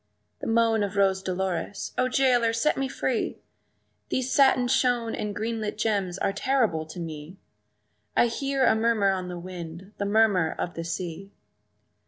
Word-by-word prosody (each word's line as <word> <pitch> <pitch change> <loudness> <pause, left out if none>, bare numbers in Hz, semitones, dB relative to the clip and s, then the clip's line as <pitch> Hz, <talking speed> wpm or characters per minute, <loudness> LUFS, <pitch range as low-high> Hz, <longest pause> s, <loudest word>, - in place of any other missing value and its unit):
The - - -5
moan 225 -1 +3
of 205 0 -2
Rose 195 -1 +3
Dolores, 190 0 -3
"O 255 - +2
jailer, 245 -3 +3
set 230 +7 +2
me 270 0 -1
free! 260 -2 -2 0.7
These 260 0 -1
satin 265 -3 +4
shoon 245 -2 +1
and 210 -1 -3
green 225 +1 -2
lit 210 -1 -3
gems 200 -5 0
are 195 - 0
terrible 205 -9 +1
to 160 - -9
me; 160 +1 -7 0.8
I - - +6
hear 270 +3 0
a - - +5
murmur 220 -3 +2
on 185 -1 -3
the 180 -1 -5
wind, 175 +2 -8
the 200 - 0
murmur 200 -5 +3
of 175 - -3
the 165 - -5
sea!" 175 +3 -5
210 Hz, 165 wpm, -26 LUFS, 185-235 Hz, 0.8 s, I